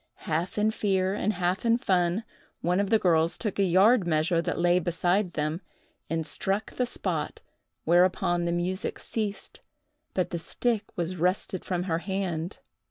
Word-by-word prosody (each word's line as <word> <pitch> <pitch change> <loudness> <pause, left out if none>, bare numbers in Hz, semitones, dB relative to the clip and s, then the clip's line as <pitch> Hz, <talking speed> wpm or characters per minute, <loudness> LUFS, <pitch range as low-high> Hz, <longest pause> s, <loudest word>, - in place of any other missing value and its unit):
Half 165 +5 -1
in 215 +1 +3
fear 190 -3 +1
and 210 +1 0
half 180 0 -1
in 230 0 +4
fun, 185 -1 +1 0.4
one 180 +3 +1
of 200 -1 0
the 220 - +5
girls 165 -4 +2
took 210 -3 -3
a - - +5
yard 190 +3 +4
measure 165 +1 +2
that - - -2
lay 175 +1 +3
beside 175 +2 0
them, 155 +4 -2 0.5
and 165 -1 -1
struck 195 +7 -1
the 250 - -1
spot, - - -3 0.4
whereupon 175 0 +3
the 170 - 0
music 180 +2 -2
ceased, 210 -3 -4 0.6
but 185 - 0
the 170 - -2
stick 225 +5 -1
was 175 +1 -2
wrested 180 +2 0
from 180 -1 -2
her 165 -3 -1
hand. 180 -2 -3
180 Hz, 165 wpm, -27 LUFS, 170-200 Hz, 0.6 s, the